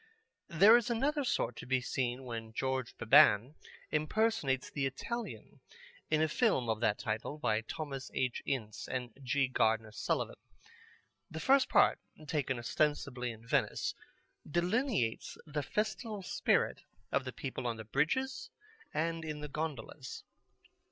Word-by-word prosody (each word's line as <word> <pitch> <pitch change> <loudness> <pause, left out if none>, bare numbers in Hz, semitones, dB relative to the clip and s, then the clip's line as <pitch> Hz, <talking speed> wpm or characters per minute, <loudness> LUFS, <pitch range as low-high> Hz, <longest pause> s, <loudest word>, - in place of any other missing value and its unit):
There 200 +7 +8
is 240 0 -1
another 280 +5 +1
sort 125 - 0
to - - -8
be 130 0 +2
seen 125 0 -2
where 115 -3 -5
George 130 +1 -2
Beban 110 +3 +6 0.4
impersonates 155 - +1
The 140 -2 0
Italian 235 - -6 0.5
in 155 0 +3
a - - +3
film 150 - +2
of 110 -1 0
that 110 -3 +2
title, 110 +7 -3
by 110 -6 +1
Thomas 135 +2 -5
H. 130 -2 0
Ince 115 -6 -3
and 125 -3 -4
G. 135 +1 +1
Gardener 110 -3 +1
Sullivan. - - -2 0.9
The 160 - -6
first 265 +6 +4
part, 205 - +5 0.3
taken 140 -4 -1
ostensibly 125 0 0
in 115 0 -9
Venice, 115 - 0 0.6
delineates 175 - 0
the 150 -1 -2
festival 215 - -2
spirit - - +1 0.3
of 135 - +1
the 130 - -5
people 130 -2 -4
on 115 -1 -2
the 110 - -8
bridges 165 - 0 0.4
and 165 +1 -1
in 155 -1 -4
gondolas. 145 -3 -5
135 Hz, 135 wpm, -33 LUFS, 120-170 Hz, 0.9 s, There